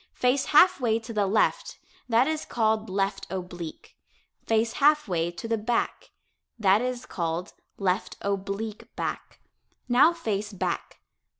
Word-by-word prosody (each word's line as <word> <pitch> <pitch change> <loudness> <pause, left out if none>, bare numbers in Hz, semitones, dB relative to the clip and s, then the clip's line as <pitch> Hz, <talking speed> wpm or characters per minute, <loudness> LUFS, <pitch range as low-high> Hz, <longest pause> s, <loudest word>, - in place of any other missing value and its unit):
Face 255 +2 +2
half 355 +4 +6
way 225 -2 +2
to 230 0 -8
the 205 -2 +1
left 220 - +1 0.3
that 235 +2 +4
is 310 +1 -1
called 220 -2 0
"left 195 +1 -1
oblique." 180 -3 -7 0.5
Face 225 0 +2
half 300 -1 +5
way 170 -3 0
to 175 +6 -7
the 225 -1 0
back 230 +2 -1 0.5
that 205 -1 +4
is 250 0 -3
called 170 +2 -3 0.2
"left 190 +1 -1
oblique 200 +2 -4
back." - - -5 0.5
Now 255 +6 +6
face 215 -10 -3
back. 195 - -3
220 Hz, 135 wpm, -26 LUFS, 195-245 Hz, 0.5 s, half